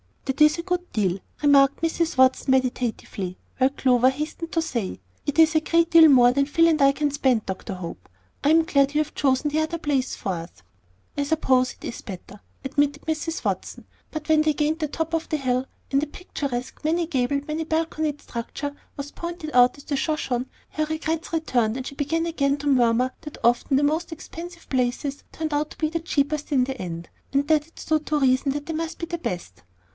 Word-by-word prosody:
"That 270 +2 -2
is 300 +1 +6
a 335 - -4
good 360 0 -2
deal," 195 -4 +1 0.2
remarked 280 -2 +5
Mrs. 330 -2 0
Watson, 260 +1 +4
meditatively, 245 -7 -1 0.2
while 260 0 +4
Clover 255 -2 +3
hastened 305 +4 -5
to 330 - +2
say, 235 - -3 0.3
"It 290 - -1
is 320 -1 +6
a 315 - +4
great 335 +1 +2
deal 330 -2 +9
more 245 -4 +7
than 275 +2 +1
Phil 330 +3 +4
and 315 -2 +2
I 275 0 +7
can 295 0 0
spend, 260 -6 +1
Dr. 190 +2 -5
Hope; 170 - -8 0.3
I 285 - +3
am 325 +1 +6
glad 280 -2 +2
you 305 - +4
have 305 - -5
chosen 280 +1 +1
the 310 - +1
other 315 +2 -1
place 280 -5 -1
for - - -5
us." 165 - -8 0.5
"I 285 - +1
suppose 260 -4 +2
it - - -13
is - - -6
better," 195 +1 -9 0.2
admitted 285 +2 0
Mm 320 +1 -3
Watson; - - -3 0.2
but 310 -1 -6
when 310 -1 +5
they 310 0 +2
gained 305 +2 0
the 310 - 0
top 325 +2 -3
of 330 0 -1
the 310 - 0
hill, 255 -2 0 0.3
and 275 0 +3
a 300 - -2
picturesque, 280 -7 -5
many 335 +3 +1
gabled, 280 -1 -1
many 310 +1 -2
balconied 315 -2 -1
structure 275 +5 -5 0.2
was 280 0 -6
pointed 340 -2 -6
out 250 +1 +5
as 285 - -13
the 285 - -2
Shoshone, 265 -5 -1 0.2
her 310 - -1
regrets 315 +1 -3
returned, 245 -8 +1
and 260 - -5
she - - -6
began 310 +4 -1
again 280 -4 +1
to 290 +1 -5
murmur 250 -1 +3
that 300 -2 -8
very 235 - +5
often 265 +3 -1
the 285 - +2
most 315 +4 0
expensive 335 +2 -9
places 260 +2 -1
turned 315 -1 -4
out 295 +1 -1
the 320 +1 -1
cheapest 300 -2 -1
in 265 -3 +4
the 265 0 -4
end, 170 -2 -6 0.2
and 280 +1 +2
that 305 -1 +3
it 330 - -27
stood 310 -1 -1
to 300 -1 +1
reason 265 0 +2
that 290 0 -4
they 325 - -4
must 325 +1 -3
be 335 - -4
the 340 0 -4
best. 175 - -5
290 Hz, 210 wpm, -24 LUFS, 255-315 Hz, 0.5 s, deal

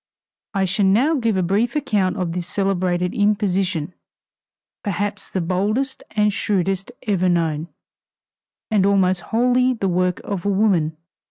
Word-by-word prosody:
I 195 -1 +2
shall 195 +2 +2
now 245 +12 +3
give 230 -8 +1
a 185 - +1
brief 210 - 0
account 215 -10 0
of 180 -3 -2
this 175 0 -4
celebrated 180 -2 0
imposition 195 -5 0 0.9
perhaps 205 -1 -3
the 190 - -2
boldest 210 +10 -1
and 210 -1 +3
shrewdest 195 0 -1
ever 185 -4 +1
known, 165 -2 0 1.0
and 205 -3 +3
almost 190 -2 +3
wholly 250 +4 +2
the 200 -4 -1
work 180 0 0
of 195 -4 -4
a 205 - 0
woman. 190 -6 +2
195 Hz, 140 wpm, -21 LUFS, 180-210 Hz, 1.0 s, now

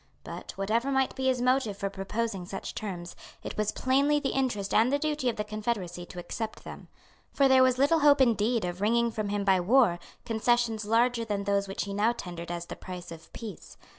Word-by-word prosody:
But, - - -8
whatever 225 +7 0
might 265 -1 +1
be 265 0 -1
his 255 -2 +1
motive 250 -5 +1
for 200 - -2
proposing 195 0 -3
such 195 0 -6
terms, 180 -5 -6 0.3
it - - -6
was 215 0 0
plainly 280 +3 +2
the 280 - -1
interest 235 -7 -1
and 230 +4 +4
the 285 - +3
duty 300 -3 -1
of 235 - -2
the 210 - -2
Confederacy 210 -5 -4
to - - -12
accept 220 +5 -5
them. - - -10 0.4
For 275 - +3
there 265 -1 +6
was 255 -1 +4
little 285 +5 +4
hope 290 -1 +5
indeed 230 -3 +2
of 180 +1 -5
wringing 235 +2 +2
from 215 -2 -3
him 205 0 -1
by 190 -2 +4
war 195 -2 +4 0.3
concessions 230 -1 +1
larger 230 +2 +2
than 205 -3 -2
those 200 0 0
which 195 - -3
he 200 - -5
now 215 +4 +2
tendered 175 -6 -7
as 175 0 -4
the - - -7
price 180 -2 -8
of 165 -1 -11
peace. 215 -7 -9
220 Hz, 210 wpm, -28 LUFS, 195-255 Hz, 0.4 s, there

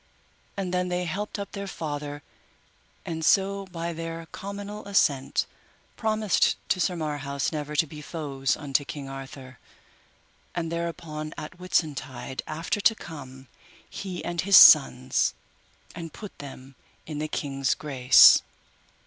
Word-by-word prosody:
And 185 -2 -3
then 180 0 0
they 180 0 -1
helped 205 +6 -4
up 200 0 -6
their 200 -1 -5
father, 145 -4 -5 0.8
and 160 -1 -4
so 195 +3 +2
by 170 -2 -4
their 165 0 -6
cominal 205 +1 -7
assent 140 -9 +2 0.5
promised 215 -2 +2
to 185 - +2
Sir 180 +1 +1
Marhaus 145 -3 -2
never 150 -1 -4
to 150 - +3
be 150 0 -10
foes 140 -4 -2
unto 145 -1 0
King 140 -1 -7
Arthur, 135 -1 -9 1.0
and 165 -1 -2
thereupon 165 -2 -4
at 155 +3 -8
Whitsuntide 140 -7 -2
after 165 +6 -2
to 225 - +4
come, 135 -8 -10 0.4
he 185 -3 -6
and 175 -1 -1
his 195 0 +7
sons, 130 -3 +7 0.6
and 165 -1 -7
put 210 +4 -10
them 135 -1 -10 0.3
in 150 -2 -5
the 155 - -2
king's 135 -3 -1
grace. 130 -4 +7
155 Hz, 130 wpm, -26 LUFS, 140-180 Hz, 1.0 s, his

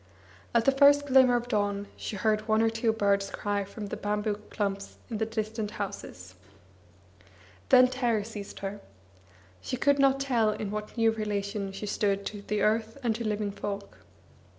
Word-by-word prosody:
At 230 -1 +4
the 275 - +6
first 285 +1 +5
glimmer 260 -2 +5
of 240 0 -1
dawn 205 -3 -1
she - - -5
heard 215 +2 0
one 220 0 +3
or 225 - +3
two 225 0 +1
birds 200 -2 +1
cry 205 -1 -2
from 205 +2 -8
the - - -3
bamboo 210 0 -1
clumps 200 -1 -3
by 220 - -2
the 220 0 -1
distant 220 -1 -3
houses. 95 - -6 1.4
Then 255 0 +8
terror 240 -4 0
seized 210 -2 -8
her. 200 +1 -5 0.8
She 255 - -3
could 285 +2 +3
not 275 0 +4
tell 245 -5 +2
in 210 -1 -3
what 210 +2 -5
new 225 -1 +4
relation 205 -2 -3
she 195 +2 -6
stood 200 -1 0
to 205 -1 -5
the 210 +1 -1
earth 220 +2 +1
and 235 -2 +2
to 235 - -4
living 210 -2 -1
folk. 200 0 -6
215 Hz, 175 wpm, -28 LUFS, 205-230 Hz, 1.4 s, Then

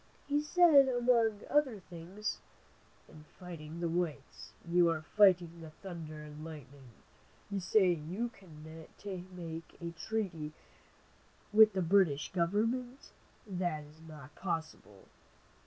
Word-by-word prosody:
He 290 +1 +1
said 300 -3 +6
among 235 -4 +2
other 280 -7 +2
things: 180 +4 -6 0.7
"In 155 - -14
fighting 165 -3 -8
the 170 - 0
whites, 165 -5 -3 0.2
you 170 0 +4
are 160 -2 -1
fighting 180 -5 +5
the 160 - -8
thunder 155 -3 -8
and 150 0 -10
lightning. 140 -4 -10 0.6
You 200 - -1
say 190 0 +4
you 175 +9 -3
can 170 -9 -15 0.3
make 180 -4 -8
a 170 0 -5
treaty 170 -4 -3 1.0
with 215 -1 +8
the 190 -1 0
British 170 -5 +3
government. 230 +9 -1 0.3
That 175 -6 -2
is 150 +2 -17
not 150 -3 -12
possible. 160 - -5
175 Hz, 120 wpm, -33 LUFS, 160-210 Hz, 1.0 s, with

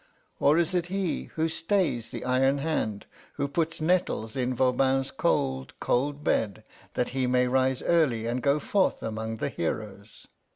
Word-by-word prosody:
Or 145 +3 +4
is 170 +1 +1
it 175 -1 0
he 190 -1 -2
who 160 0 +1
stays 165 - 0
the - - -6
iron 135 +2 +3
hand, 140 -9 -2 0.3
who 140 -1 -2
puts 165 +3 -1
nettles 155 -9 0
in 130 -1 0
Voban's 130 +1 +2
cold, 135 -3 -1
cold 145 +4 0
bed, 110 -6 0 0.3
that 125 - 0
he 130 -1 -1
may 125 0 +3
rise 130 0 +1
early 140 -10 +2
and 120 +2 -1
go 140 +2 +3
forth 190 +6 +1
among 110 0 -3
the - - -2
heroes?" 100 +4 -5
135 Hz, 160 wpm, -27 LUFS, 120-155 Hz, 0.3 s, Or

